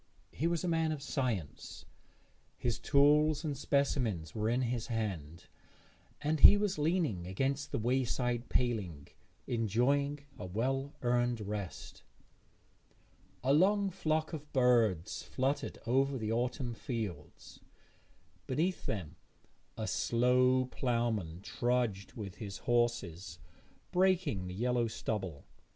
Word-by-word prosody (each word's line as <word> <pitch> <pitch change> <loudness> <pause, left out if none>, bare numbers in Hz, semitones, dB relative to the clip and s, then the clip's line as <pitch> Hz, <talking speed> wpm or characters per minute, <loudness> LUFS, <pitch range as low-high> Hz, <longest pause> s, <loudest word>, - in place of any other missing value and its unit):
He 160 - -1
was 170 0 0
a - - -1
man 165 -2 +1
of 155 - -3
science; 115 - -3 0.7
his 120 -3 -1
tools 150 +2 +4
and 150 -3 -2
specimens 125 - 0
were 110 0 0
in 125 +2 +1
his 120 -1 -2
hand, 90 -8 -4 0.8
and 150 +1 0
he 205 - +9
was 205 -4 -1
leaning 150 - 0
against 135 +9 -1
the - - -1
wayside 120 0 0
paling, 100 - -1 0.4
enjoying 125 +6 +1 0.2
a - - -5
well 135 +8 -2
earned 120 -1 +1
rest. 100 -2 -6 1.4
A 135 +2 +3
long 195 +5 +3
flock 155 -2 -1
of 150 -1 -7
birds 115 - +2
fluttered 135 +3 -2
over 135 +3 +2
the 110 -2 -2
autumn 120 +1 -1
fields; 115 - -6 0.9
beneath 165 +8 -1
them 85 -6 -4 0.6
a - - -2
slow 125 +2 +3
ploughman 115 -10 -1
trudged 120 -6 -1
with 105 -5 -7
his 100 -2 -6
horses, 95 -9 -1 0.5
breaking 180 - +2
the 90 - -6
yellow 120 +2 +1
stubble. 95 -8 -4
125 Hz, 115 wpm, -33 LUFS, 105-140 Hz, 1.4 s, he